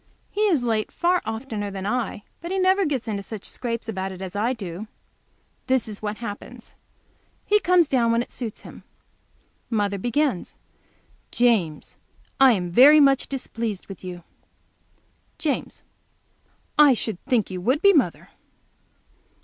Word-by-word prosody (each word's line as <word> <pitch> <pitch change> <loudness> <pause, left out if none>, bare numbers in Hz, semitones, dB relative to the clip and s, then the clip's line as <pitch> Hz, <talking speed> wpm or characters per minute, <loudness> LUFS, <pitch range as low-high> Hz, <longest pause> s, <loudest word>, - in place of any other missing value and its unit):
He 420 - -2
is 320 -11 +2
late 220 -3 0
far 355 +1 +1
oftener 220 -2 -4
than 195 -1 -6
I 240 +1 -1
am, - - -11 0.2
but 340 - -6
he 385 - -1
never 380 +1 +3
gets 265 -5 -2
into 205 -2 -2
such 205 0 -8
scrapes 235 -2 -3
about 190 -3 -3
it 185 - -9
as 190 0 -7
I 220 +4 +1
do. 200 -4 -6 0.8
This 260 -3 +2
is 210 -2 -7
what 210 0 -3
happens. 230 -3 -8 0.7
He 420 +1 +4
comes 360 -4 +4
down 240 -4 +2
when 230 +1 +2
it - - -16
suits 230 -4 -6
him. - - -12 0.9
Mother 205 -3 0
begins. 245 - -1 0.7
"James, 215 -11 0 0.4
I 265 -2 +7
am 180 -4 -2
very 280 - +8
much 275 -2 +4
displeased 230 -6 -4
with 195 -2 -11
you." 180 -2 -7 1.1
James. 295 -4 -3 1.0
"I 290 -4 +7
should 220 -5 -4
think 245 -7 +1
you 185 -1 -5
would 260 - +1
be, 400 0 +7
mother." 295 -7 +1
230 Hz, 150 wpm, -24 LUFS, 205-275 Hz, 1.1 s, very